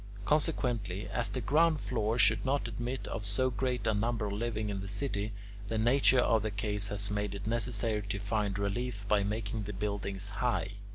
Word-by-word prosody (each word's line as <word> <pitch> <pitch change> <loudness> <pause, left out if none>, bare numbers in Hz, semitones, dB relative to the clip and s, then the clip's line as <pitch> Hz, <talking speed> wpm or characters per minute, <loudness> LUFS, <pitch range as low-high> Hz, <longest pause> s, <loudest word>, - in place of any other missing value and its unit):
Consequently, 120 - 0
as 120 -1 0
the 130 - -3
ground 155 +6 +3
floors 115 -2 +2
could 110 -2 +1
not 135 -1 0
admit 120 +3 -4
of - - -4
so 115 +6 +2
great 125 +1 -1
a 110 - +3
number 110 0 0
living 110 0 -2
in 100 -1 -3
the 100 - -5
city, 105 0 -1 0.4
the 110 - -1
nature 125 +4 +4
of 115 -2 +3
the 110 - -1
case 105 0 -1
has 100 0 -1
made 105 -1 -1
it 100 0 -6
necessary 115 -1 0
to 100 0 -3
find 100 0 -1
relief 100 +1 -2
by 105 -1 +3
making 105 +1 -2
the 105 - -5
buildings 100 -1 -2
high. 115 -3 -1
110 Hz, 185 wpm, -31 LUFS, 100-120 Hz, 0.4 s, nature